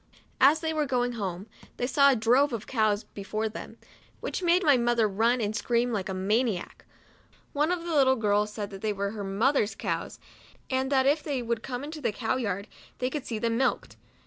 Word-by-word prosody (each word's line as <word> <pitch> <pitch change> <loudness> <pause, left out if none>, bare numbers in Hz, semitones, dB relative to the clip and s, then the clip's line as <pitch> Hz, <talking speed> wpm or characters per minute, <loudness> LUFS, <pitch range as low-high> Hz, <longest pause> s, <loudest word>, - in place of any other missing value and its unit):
As 295 +4 +5
they 320 -1 -1
were 305 -2 0
going 245 -2 0
home, 195 -5 -4 0.3
they 245 - -1
saw 280 +2 +5
a 270 - +4
drove 250 +5 +3
of 225 -1 -4
cows 215 -4 +1
be 200 - -10
fore 215 +2 -2
them, 220 - -8 0.4
which - - -4
made 355 +1 +3
my 290 -3 +6
mother 235 -2 +2
run 225 +5 +2
and 215 -1 -1
scream 240 +1 +1
like 195 -3 -2
a - - -2
maniac. 205 +1 -1 0.7
One 300 +4 +1
of 355 -2 -2
the 340 -1 -3
little 265 -3 +5
girls 210 -2 +1
said 210 -1 -5
that 195 -1 -9
they 215 -1 0
were 200 0 -2
her 210 -2 -6
mother's 210 +4 +1
cows, - - -3 0.5
and 260 +1 0
that 265 -1 +3
if 290 +3 +3
they 275 -5 -3
would 235 -1 -2
come 250 +2 -5
into 305 +1 -7
the - - 0
cow 225 +3 -1
yard, 200 -4 -3 0.3
they 255 +1 -2
could 290 -2 -5
see 225 - -3
them 230 +1 0
milked. 265 - 0
235 Hz, 215 wpm, -27 LUFS, 210-270 Hz, 0.7 s, my